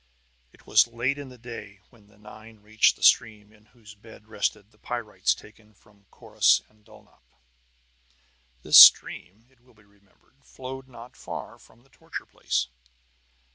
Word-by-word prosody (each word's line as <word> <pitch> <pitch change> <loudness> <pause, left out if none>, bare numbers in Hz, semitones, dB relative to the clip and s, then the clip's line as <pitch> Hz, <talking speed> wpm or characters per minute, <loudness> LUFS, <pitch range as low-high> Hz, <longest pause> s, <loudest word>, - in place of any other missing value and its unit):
It - - -25
was 110 +2 +3
late 120 +4 -3
in 140 -2 -10
the 125 - -15
day 115 -4 -11
when 110 -4 -24
the 100 -1 -26
nine 110 +1 -16
reached 110 +1 +1
the - - -14
stream 105 -2 +1
in 105 0 -25
whose 110 -3 -18
bed 110 0 -18
rested 105 -1 -5
the 105 - -30
pyrites 120 -3 -3
taken 110 0 -20
from 100 0 -28
Corrus - - 0
and 110 0 -31
Dulnop. - - -22 1.4
This - - +7
stream, 105 +6 +5
it 130 - -32
will 125 -1 -28
be 105 - -25
remembered, 100 +5 -33
flowed 130 +1 -11
not 120 -1 -15
far - - -10
from 120 +2 -23
the 135 - -30
torture - - -10
place. - - -3
110 Hz, 160 wpm, -24 LUFS, 105-120 Hz, 1.4 s, This